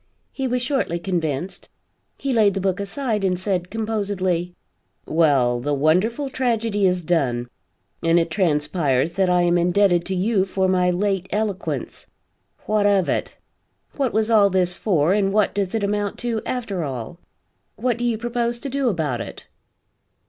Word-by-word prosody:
He 270 -1 -3
was 250 0 -1
shortly 265 - 0
convinced. 170 -2 -3 0.5
He 275 -1 -2
laid 210 -4 +3
the - - 0
book 190 0 -1
aside 215 0 -2
and 180 -2 +1
said, 185 -2 -2
composedly: 195 -5 -2 0.5
"Well, 140 -7 +2
the 145 +4 -1
wonderful 185 - +1
tragedy 230 -6 0
is 180 -2 -1
done, 130 -8 0 0.5
and 165 +1 +3
it 165 -1 +1
transpires 150 -4 +1
that 190 +1 +1
I 180 0 +3
am 175 0 +3
indebted 175 0 +3
to 190 - -2
you 195 +1 +2
for 190 0 0
my 180 -1 +2
late 190 0 0
eloquence. 205 -2 -3 0.6
What 210 -1 +2
of 195 -3 +2
it? - - -2 0.6
What 270 -5 0
was 220 +1 +1
all 205 -3 +6
this 180 -2 +2
for 175 -4 +1
and 195 -1 +1
what 210 0 +2
does 200 0 -2
it 220 - -1
amount 205 0 -1
to 235 -2 -1
after 215 -8 -3
all? 135 +4 -6 0.6
What 245 -2 -1
do - - -2
you 235 -2 +1
propose 235 +1 -2
to 280 - -4
do 270 -1 0
about 150 - -1
it?" 105 - -8
190 Hz, 165 wpm, -22 LUFS, 170-220 Hz, 0.6 s, all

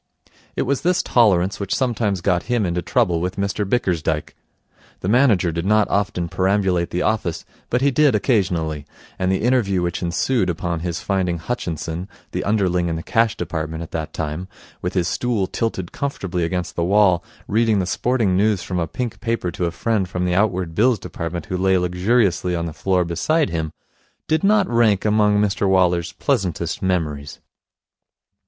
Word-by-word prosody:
It - - 0
was 140 +1 0
this 180 +1 +2
tolerance 100 -5 +3
which 100 -1 -1
sometimes 115 -7 0
got 90 +3 0
him 120 -4 +2
into 90 0 -1
trouble 90 -3 +1
with 90 +1 -2
Mr 100 0 -2
Bickersdyke. 85 - -1 0.7
The - - -3
manager 105 -7 +3
did 85 +1 -3
not 105 +2 +3
often 100 -4 0
perambulate 95 -1 +1
the 90 - -1
office, 105 -7 -1 0.2
but 125 - +1
he 140 +1 +3
did 145 +1 +4
occasionally, 85 - 0 0.3
and 95 0 +1
the 95 - 0
interview 110 -7 +2
which 85 -1 -2
ensued 90 +4 0
upon 85 0 -2
his 85 +1 -3
finding 95 -3 0
Hutchinson, 85 - -4 0.2
the - - -2
underling 95 -4 +1
in 80 - -2
the 80 - -5
Cash 115 -1 +1
Department 80 -2 -4
at 80 - -10
that 80 -2 -4
time, 80 +4 -4 0.3
with 90 +2 -3
his 90 -2 +1
stool 105 +2 0
tilted 95 -3 -3
comfortably 95 -11 -3
against 90 +1 -3
the 85 - 0
wall, 95 -2 +4 0.2
reading 110 0 +2
the 95 - +1
sporting 110 0 +1
news 100 -1 +2
from 90 -1 -3
a 85 - -1
pink 120 +2 -4
paper 115 -6 -1
to 90 +1 -2
a 85 - -1
friend 100 +1 -1
from 90 -1 -2
the 90 - 0
Outward 90 -3 +1
Bills 120 +5 +3
Department 85 -1 -5
who 95 -4 -3
lay 95 0 +3
luxuriously 90 0 +1
on 85 0 -2
the 80 - -5
floor 90 +1 +1
beside 125 - +1
him, 80 -2 -2 0.6
did 160 0 +1
not 205 -1 +4
rank 110 -5 +2
among 105 -1 +3
Mr 100 -1 +1
Waller's 90 -2 +2
pleasantest 90 - -1
memories. 75 -6 -2
95 Hz, 175 wpm, -21 LUFS, 85-110 Hz, 0.7 s, did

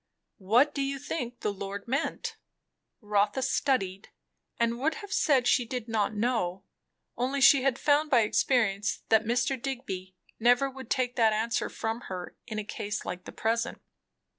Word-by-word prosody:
"What 240 +10 +3
do 280 - -2
you 275 0 -1
think 255 -3 -5
the 205 - -1
Lord 200 +1 -6
meant?" 325 - -2 0.7
Rotha 210 +3 +1
studied, 195 -9 0 0.5
and 235 0 +1
would 310 +5 +1
have 410 -3 -7
said 270 -6 +3
she 250 - +4
"did 240 0 -5
not 220 -1 0
know," 205 -5 -1 0.5
only 260 +3 -1
she 275 0 +7
had 265 -1 +1
found 295 +2 +2
by 250 -5 +5
experience 215 -2 +1
that 220 0 +4
Mr. 245 +3 0
Digby 190 -9 -5 0.2
never 245 +4 +4
would 265 0 -10
take 250 -2 0
that 225 -2 +4
answer 230 +2 0
from 225 +2 -3
her 180 -1 -6
in 215 -2 -5
a 215 - -2
case 210 0 -4
like 180 - -5
the - - -8
present. 230 +1 -1
235 Hz, 165 wpm, -28 LUFS, 210-270 Hz, 0.7 s, she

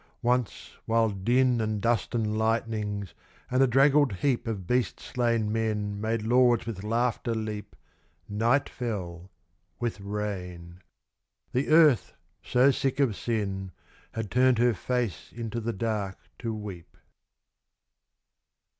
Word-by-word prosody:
Once 125 -2 0 0.2
while 115 0 +3
din 120 +5 +2
And 110 -1 -1
dust 115 +2 0
and 110 -2 0
lightnings, 110 -4 -1 0.4
and 130 +1 +3
a 135 - +6
draggled 135 +1 +4
heap 120 +5 0
Of 100 -5 -3
beast 125 0 0
slain 115 -3 0
men 105 -2 -1
made 110 0 -1
lords 120 0 +4
with 105 -4 -5
laughter 115 +1 0
leap, 105 -2 -5 0.5
Night 115 +7 +2
fell, 95 -7 -5 0.5
with 120 -4 -2
rain. 90 -4 -5 0.7
The 130 +3 0
earth, 155 -6 +5 0.3
so 130 +6 +4
sick 135 0 -1
of 130 -7 +2
sin, 100 -5 -3 0.4
Had 115 -3 -4
turned 125 -1 +4
her 120 +1 +4
face 120 -1 -3
into 115 -1 -4
the 115 +1 -2
dark 100 -2 -2 0.2
to 115 -2 -3
weep. 105 -6 -8
115 Hz, 125 wpm, -27 LUFS, 105-120 Hz, 0.7 s, a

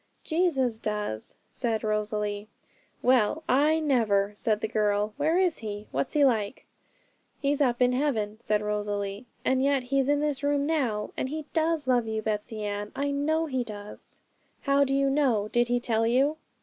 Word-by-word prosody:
'Jesus 275 -9 +1
does,' 210 - -3 0.2
said 225 -4 -1
Rosalie. 210 -1 -1 0.6
'Well, 255 +4 +3
I 300 +5 +3
never!' 215 -9 +2
said 215 0 0
the - - 0
girl. 210 -1 0
'Where 310 +4 +2
is 365 -3 +2
He? 210 -2 -6
what's 140 +1 -2
He 290 -2 +5
like?' 220 -3 0 0.7
'He's 285 0 0
up 250 -2 +3
in 250 - +4
heaven,' 225 -6 -1
said 210 -2 0
Rosalie, 205 +1 -3 0.2
'and 260 0 +2
yet 275 -2 +2
He's 270 +2 +1
in 290 0 +3
this 295 -2 -1
room 285 0 +1
now, 250 -10 -1
and 260 - -2
He 310 +1 -4
does 320 -3 +1
love 245 -3 +2
you, 220 0 -2
Betsey 215 0 -3
Ann; 205 0 -3
I 285 +1 -1
know 310 +3 +1
He 260 -5 -1
does.' 210 -2 -10 0.4
'How 280 0 +3
do 270 0 0
you 275 0 +2
know? 260 -7 +2
did 240 +1 +2
He 245 0 +1
tell 225 -2 +1
you?' 275 +6 +2
245 Hz, 175 wpm, -27 LUFS, 210-285 Hz, 0.7 s, He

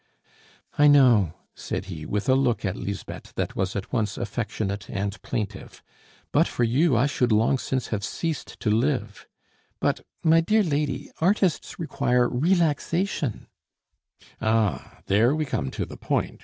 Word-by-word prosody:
"I 145 - +7
know," 120 - +5 0.2
said 90 - -4
he, 80 -5 -7
with 105 0 -2
a 130 - +5
look 125 -5 +1
at 95 - -1
Lisbeth 100 -1 -6
that - - -2
was 95 0 -1
at 100 +4 -5
once 110 -4 0
affectionate 105 -3 -3
and 100 +1 -3
plaintive, 105 -3 -5 0.5
"but - - +4
for 120 - -1
you 130 +4 +3
I 120 - +4
should 125 -4 +1
long 115 +5 +3
since 130 -1 -2
have 100 -2 -2
ceased 165 +5 -4
to 105 - +1
live. 115 -2 -1 0.5
But, - - +1 0.2
my 165 0 +5
dear 215 +6 +3
lady, 145 -4 -2
artists 190 0 +1
require 125 -6 +1
relaxation 165 - 0 0.5
" - - -28
"Ah! 110 -3 0
there 115 +8 +3
we 155 -1 -1
come 70 - -2
to - - -3
the - - -10
point!" - - -2
120 Hz, 155 wpm, -25 LUFS, 105-145 Hz, 0.5 s, I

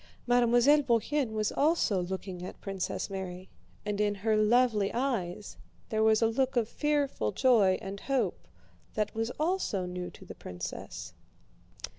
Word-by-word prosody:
Mademoiselle 245 +4 +5
Bourienne 265 +2 +1
was 215 -1 0
also 285 - +2
looking 185 0 -5
at 185 - -8
Princess 195 -2 -3
Mary, 185 -1 -6 0.4
and 210 0 -1
in 205 -1 +1
her 215 +2 +1
lovely 215 -1 +3
eyes 215 -7 -2 0.3
there 220 -2 0
was 220 +1 +4
a - - +5
look 260 +4 0
of 235 -3 +2
fearful 285 - 0
joy 220 -8 +4
and 195 +1 -6
hope 250 -8 -1 0.5
that 210 -1 -1
was 225 +1 -1
also 310 - 0
new 180 0 -5
to - - -14
the - - -8
princess. 90 -1 -7
220 Hz, 145 wpm, -30 LUFS, 195-250 Hz, 0.5 s, Mademoiselle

